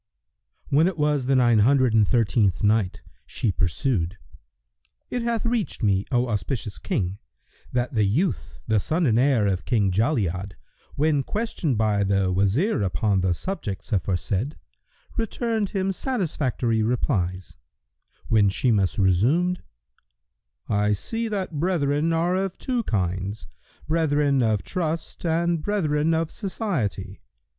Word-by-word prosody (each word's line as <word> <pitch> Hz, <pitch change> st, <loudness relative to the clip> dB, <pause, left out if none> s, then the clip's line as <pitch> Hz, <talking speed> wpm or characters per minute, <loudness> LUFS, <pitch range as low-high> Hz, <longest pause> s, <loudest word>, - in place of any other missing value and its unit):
When 155 Hz, +5 st, +4 dB
it 185 Hz, -3 st, -2 dB
was 150 Hz, -3 st, +1 dB
the 135 Hz, -, +3 dB
Nine 120 Hz, -3 st, +4 dB
Hundred 130 Hz, +1 st, +4 dB
and 110 Hz, -2 st, +4 dB
Thirteenth 110 Hz, -4 st, +2 dB
Night, 105 Hz, -2 st, +1 dB, 0.3 s
She 110 Hz, -, -1 dB
pursued: 95 Hz, -, -1 dB, 0.9 s
It 245 Hz, -, -1 dB
hath 235 Hz, -1 st, -1 dB
reached 230 Hz, -, -1 dB
me, 100 Hz, -2 st, +2 dB
O 125 Hz, 0 st, +2 dB
auspicious 105 Hz, 0 st, -3 dB
King, 95 Hz, +1 st, -2 dB, 0.5 s
that 125 Hz, 0 st, -1 dB
the 110 Hz, -3 st, +2 dB
youth, 140 Hz, -, -1 dB
the 110 Hz, -2 st, +2 dB
son 160 Hz, -, 0 dB
and 115 Hz, -3 st, +3 dB
heir 130 Hz, -5 st, +3 dB
of 95 Hz, -3 st, 0 dB
King 105 Hz, -6 st, +1 dB
Jali'ad, 100 Hz, -, 0 dB, 0.4 s
when 150 Hz, -1 st, +2 dB
questioned 180 Hz, -, -2 dB
by 105 Hz, -2 st, +2 dB
the 95 Hz, -1 st, +1 dB
Wazir 105 Hz, -, +1 dB
upon 100 Hz, 0 st, +1 dB
the 90 Hz, -1 st, +1 dB
subjects 120 Hz, -, -5 dB
aforesaid, 100 Hz, -, -1 dB, 0.6 s
returned 225 Hz, -2 st, -1 dB
him 195 Hz, -2 st, -1 dB
satisfactory 150 Hz, -, -1 dB
replies; 95 Hz, -6 st, -1 dB, 0.7 s
when 105 Hz, -3 st, +4 dB
Shimas 100 Hz, -2 st, +1 dB
resumed, 130 Hz, -, +2 dB, 1.1 s
"I 105 Hz, 0 st, +2 dB
see 225 Hz, -, -3 dB
that 190 Hz, -8 st, -3 dB
brethren 155 Hz, -2 st, +1 dB
are 170 Hz, +2 st, +1 dB
of 190 Hz, -1 st, -2 dB
two 250 Hz, -3 st, -1 dB
kinds, 95 Hz, +1 st, -2 dB, 0.4 s
brethren 145 Hz, -4 st, +2 dB
of 110 Hz, -4 st, +1 dB
trust 165 Hz, -2 st, -3 dB
and 170 Hz, 0 st, +1 dB
brethren 160 Hz, -5 st, +1 dB
of 160 Hz, 0 st, -1 dB
society. 130 Hz, -, -3 dB
125 Hz, 130 wpm, -24 LUFS, 100-165 Hz, 1.1 s, When